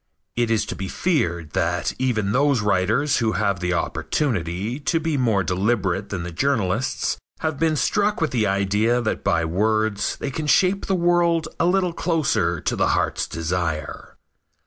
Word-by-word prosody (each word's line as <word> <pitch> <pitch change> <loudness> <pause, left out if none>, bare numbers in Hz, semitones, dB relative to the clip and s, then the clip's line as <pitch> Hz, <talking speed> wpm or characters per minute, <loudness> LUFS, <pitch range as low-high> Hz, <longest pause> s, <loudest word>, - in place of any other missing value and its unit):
It 120 -1 +1
is 115 -2 +1
to - - -5
be 95 - -5
feared 85 - -1
that 90 -1 0
even 110 -6 0
those 140 0 +2
writers 110 +9 +1
who 110 -2 +1
have 100 -3 0
the 90 0 -1
opportunity 100 - -2
to 165 +3 0
be 160 -1 -1
more 115 -7 +2
deliberate 95 0 0
than 95 -4 -4
the 90 - -6
journalists 120 +2 0 0.2
have 155 -3 -2
been 160 -1 +2
struck 210 +6 +1
with 160 -3 0
the 110 -4 +1
idea 100 +5 +1
that 115 -3 -2
by 80 +2 +1
words 105 +4 0
they 140 - -4
can 155 +2 -4
shape 190 +5 +3
the 195 - +1
world 170 -2 +2
a 170 - +3
little 180 -1 +1
closer 165 -3 0
to - - -1
the - - +1
heart's - - -1
desire. 80 -2 -3
115 Hz, 170 wpm, -22 LUFS, 95-150 Hz, 0.2 s, shape